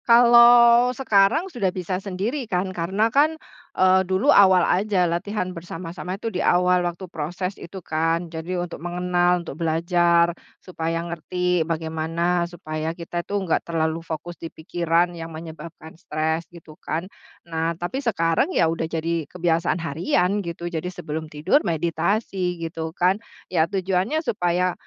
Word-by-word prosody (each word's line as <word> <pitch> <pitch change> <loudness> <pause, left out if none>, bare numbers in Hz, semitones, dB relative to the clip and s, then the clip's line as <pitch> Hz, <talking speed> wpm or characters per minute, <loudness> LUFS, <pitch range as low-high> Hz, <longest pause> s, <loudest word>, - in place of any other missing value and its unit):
Kalau 235 0 +7
sekarang 215 - +3
sudah 240 - -1
bisa 185 +1 -3
sendiri 210 +7 -3
kan, 185 +1 -1
karena 195 +6 0
kan, 305 +3 +3 0.4
eee, 185 0 +5
dulu 190 +10 +2
awal 190 -3 +6
aja 190 -1 +2
latihan 185 +2 -2
bersama-sama 175 +2 -6
itu 225 +1 -5
di 180 - -1
awal 180 0 +3
waktu 175 +1 -3
proses 180 +3 -4
itu 185 0 -9
kan, 165 +2 0
jadi 165 +3 -4
untuk 175 - -9
mengenal, 175 0 +1
untuk 160 0 -8
belajar, 170 +1 +2 0.2
supaya 165 -2 -4
ngerti 180 +1 -1
bagaimana, 165 +2 -1
supaya 160 -1 -5
kita 175 0 -4
tuh 200 +2 -3
nggak 165 - +1
terlalu 160 -1 -1
fokus 165 +1 -7
di 165 - -5
pikiran 170 +2 0
yang 165 -1 -7
menyebabkan 160 0 -10
stres 160 0 -3
gitu 165 -2 -14
kan. 165 +3 -3 0.4
Nah, 165 0 -2
tapi 175 +11 -3
sekarang 165 - +1
ya - - +5
udah 160 -1 -3
jadi 165 -1 -2
kebiasaan 170 -1 0
harian 180 +5 0
gitu, 170 -2 -6
jadi 175 0 -3
sebelum 160 -3 -6
tidur 155 - +2
meditasi 175 +2 -1
gitu 165 -1 -4
kan, 185 +4 +2 0.3
ya 165 -1 +2
tujuannya 190 - 0
supaya 180 -2 0
175 Hz, 145 wpm, -23 LUFS, 165-190 Hz, 0.4 s, Kalau